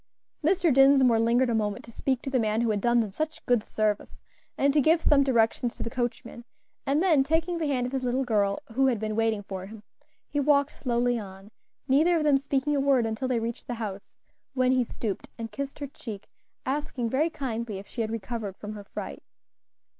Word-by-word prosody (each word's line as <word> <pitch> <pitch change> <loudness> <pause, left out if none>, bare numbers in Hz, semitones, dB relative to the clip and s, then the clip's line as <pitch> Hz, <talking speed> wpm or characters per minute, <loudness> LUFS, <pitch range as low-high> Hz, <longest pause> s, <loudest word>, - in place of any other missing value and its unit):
Mr. 335 -1 +3
Dinsmore 270 -3 +6
lingered 235 +2 +3
a - - +1
moment 210 -2 -1
to 235 - -12
speak 260 +2 -1
to 270 - -4
the 260 - +2
man 220 0 +1
who 235 -2 +1
had 205 -1 -1
done 240 +1 +3
them 215 -3 -3
such 310 +6 -4
good 245 -3 +2
service, 215 -1 -2 0.3
and 280 0 +3
to 295 - +4
give 320 +4 +4
some 295 -3 +4
directions 235 -2 +1
to - - -5
the 230 - -5
coachman; 240 -1 -4 0.4
and 290 +5 +2
then, 315 -8 +4
taking 325 +4 0
the 315 - -1
hand 255 -3 0
of 250 - -4
his 265 - -1
little 255 +1 0
girl, 205 -5 +1 0.2
who 265 +3 +3
had 240 -5 +1
been 215 0 -3
waiting 225 -2 +1
for 190 -1 -6
him, 215 0 -11 0.4
he 290 - -2
walked 285 0 +3
slowly 245 -1 0
on, 195 0 -10 0.4
neither 315 +6 +4
of 315 - 0
them 290 -2 +4
speaking 280 +1 0
a - - +2
word 270 -4 +3
until 225 +4 -2
they 250 -2 +1
reached 230 +1 -5
the 245 - -3
house, 205 -4 -7 0.4
when 255 -1 +3
he 255 -1 +3
stooped 220 -3 -5
and 225 -2 -6
kissed 275 +5 -5
her 290 - -4
cheek, 225 -7 -9 0.4
asking 270 -3 -2
very 280 +8 +1
kindly 235 -8 -4
if 195 - -9
she 235 - -4
had 220 - -1
recovered 220 -2 -4
from 210 0 -7
her 205 -1 -8
fright. 70 - -7
245 Hz, 215 wpm, -27 LUFS, 220-275 Hz, 0.4 s, Dinsmore